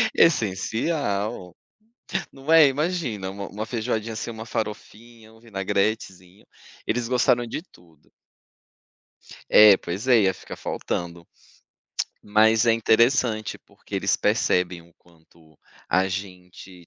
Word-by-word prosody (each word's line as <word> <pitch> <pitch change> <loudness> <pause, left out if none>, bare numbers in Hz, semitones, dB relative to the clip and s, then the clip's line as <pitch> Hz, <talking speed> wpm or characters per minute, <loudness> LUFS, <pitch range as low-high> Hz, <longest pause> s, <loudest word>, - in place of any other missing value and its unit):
Essencial. 110 - 0 0.8
Não 135 +3 -5
é? 160 -3 +8
Imagina 135 - -2
uma 100 0 -7
uma 105 +2 -6
feijoadinha 115 -1 -3
sem 115 - -5
uma 110 0 -8
farofinha, 110 +1 -7
um 110 - -19
vinagretezinho, 100 -3 -3 0.4
eles 120 -1 -1
gostaram 120 -1 +2
de 115 - -5
tudo. 85 - -24 1.4
É, 105 -2 +8
pois 95 +8 -6
é, 120 -4 +5
ia 95 -1 +2
ficar - - -10
faltando. 85 -1 -5 1.0
Mas 110 +2 +3
é 115 - +5
interessante, 115 -1 +2
porque - - -13
eles - - +1
percebem 90 -1 0
o 85 +1 -23
quanto 80 -2 -25 0.3
a 95 +1 +2
gente 90 -1 -8
105 Hz, 115 wpm, -24 LUFS, 95-115 Hz, 1.4 s, é